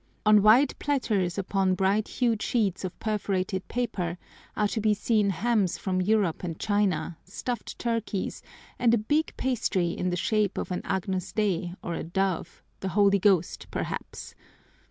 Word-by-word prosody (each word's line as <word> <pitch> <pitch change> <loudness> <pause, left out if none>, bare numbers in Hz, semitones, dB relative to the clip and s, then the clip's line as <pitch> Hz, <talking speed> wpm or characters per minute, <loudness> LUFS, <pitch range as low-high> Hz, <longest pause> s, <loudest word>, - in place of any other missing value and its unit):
On 210 -1 +7
wide 225 +7 +6
platters 210 -11 0
upon 195 -1 +1
bright 195 +3 +1
hued 230 -4 0
sheets 205 -7 0
of 185 -1 -5
perforated 190 -3 -2
paper 180 -8 -2 0.4
are 210 - +3
to 220 - -2
be 210 0 +3
seen 210 -1 +2
hams 200 0 +1
from 185 -1 -1
Europe 195 -4 +1
and 165 -3 -4
China, 205 -5 0
stuffed 240 +6 -5
turkeys, 230 -4 -2 0.4
and 235 -1 +4
a - - +2
big 295 +9 0
pastry 220 -9 0
in 180 +1 -2
the 180 - -1
shape 210 +2 +1
of - - -3
an 180 - -2
Agnus 190 -1 -2
Dei 185 -4 -1
or 175 - -3
a - - -3
dove, 180 0 -2 0.2
the 190 - -3
Holy 200 +1 +4
Ghost 185 -4 +2
perhaps. - - -5
200 Hz, 155 wpm, -27 LUFS, 185-220 Hz, 0.4 s, On